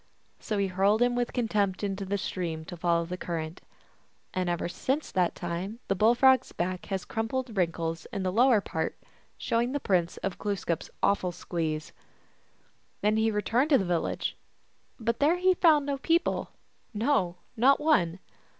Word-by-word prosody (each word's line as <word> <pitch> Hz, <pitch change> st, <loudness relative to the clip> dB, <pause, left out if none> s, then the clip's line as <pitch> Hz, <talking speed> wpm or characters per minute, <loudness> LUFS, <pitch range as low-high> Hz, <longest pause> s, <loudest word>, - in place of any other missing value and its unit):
So 210 Hz, -, -3 dB
he 200 Hz, -, +2 dB
hurled 195 Hz, +3 st, +2 dB
him 245 Hz, 0 st, +2 dB
with 245 Hz, 0 st, -1 dB
contempt 210 Hz, -5 st, 0 dB
into 195 Hz, -1 st, -2 dB
the 200 Hz, +2 st, -1 dB
stream, 170 Hz, -5 st, -4 dB
to 175 Hz, -, -7 dB
follow 170 Hz, 0 st, +1 dB
the 180 Hz, +2 st, -5 dB
cur 175 Hz, -1 st, -4 dB
rent. 160 Hz, +2 st, -6 dB, 0.7 s
And 185 Hz, -1 st, -1 dB
ever 175 Hz, 0 st, -1 dB
since 270 Hz, -, -2 dB
that 180 Hz, -2 st, +1 dB
time 175 Hz, +5 st, -4 dB
the -, -, +4 dB
Bull 220 Hz, +5 st, +4 dB
Frog 260 Hz, +1 st, +6 dB
s -, -, -17 dB
back 180 Hz, +1 st, -3 dB
has 190 Hz, -1 st, -3 dB
crumpled 225 Hz, +1 st, -3 dB
wrinkles 165 Hz, -3 st, -1 dB
in 195 Hz, -, -3 dB
the 185 Hz, -, 0 dB
lower 235 Hz, +1 st, +4 dB
part, -, -, -3 dB, 0.4 s
showing 235 Hz, +3 st, 0 dB
the 285 Hz, -, 0 dB
prints 180 Hz, -8 st, 0 dB
of 195 Hz, -, -3 dB
Glooskap 195 Hz, -5 st, -2 dB
s -, -, -10 dB
awful 185 Hz, -3 st, +2 dB
squeeze. 160 Hz, -3 st, -3 dB, 1.1 s
Then 210 Hz, +1 st, +2 dB
he 220 Hz, 0 st, +3 dB
returned 230 Hz, +6 st, +1 dB
to 280 Hz, -, +6 dB
the 195 Hz, -, -1 dB
village; 175 Hz, -2 st, -1 dB, 0.6 s
but 230 Hz, 0 st, -1 dB
there 310 Hz, +5 st, +4 dB
he 370 Hz, +1 st, +4 dB
found 315 Hz, -5 st, +4 dB
no 280 Hz, -1 st, -2 dB
people, 335 Hz, +4 st, +1 dB, 0.5 s
no, 210 Hz, -6 st, +1 dB, 0.2 s
not 260 Hz, +4 st, +5 dB
one. 240 Hz, -, +2 dB
200 Hz, 175 wpm, -28 LUFS, 175-245 Hz, 1.1 s, Frog